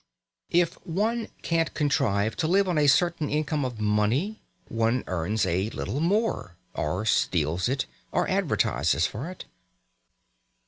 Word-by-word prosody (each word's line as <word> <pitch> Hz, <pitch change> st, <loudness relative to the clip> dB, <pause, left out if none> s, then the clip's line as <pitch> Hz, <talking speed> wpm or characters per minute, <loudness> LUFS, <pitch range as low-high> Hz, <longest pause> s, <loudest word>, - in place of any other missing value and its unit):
If 175 Hz, -1 st, +1 dB
one 220 Hz, +7 st, -1 dB, 0.2 s
can't 165 Hz, -1 st, 0 dB
contrive 115 Hz, -8 st, +1 dB
to 160 Hz, -, 0 dB
live 195 Hz, +3 st, +3 dB
on 175 Hz, -4 st, +1 dB
a 145 Hz, -, +4 dB
certain 165 Hz, +1 st, +3 dB
income 150 Hz, 0 st, 0 dB
of 125 Hz, -4 st, -4 dB
money, 110 Hz, -, +1 dB, 0.3 s
one 115 Hz, +2 st, 0 dB
earns 95 Hz, +4 st, -1 dB
a 95 Hz, +4 st, 0 dB
little 135 Hz, -, -3 dB
more 185 Hz, -, 0 dB, 0.2 s
or 90 Hz, +8 st, -2 dB
steals 85 Hz, -1 st, +1 dB
it, 135 Hz, +1 st, 0 dB, 0.3 s
or -, -, +1 dB
advertises 80 Hz, +5 st, +1 dB
for 130 Hz, +10 st, -4 dB
it. 185 Hz, -, -9 dB
130 Hz, 135 wpm, -26 LUFS, 105-170 Hz, 0.3 s, a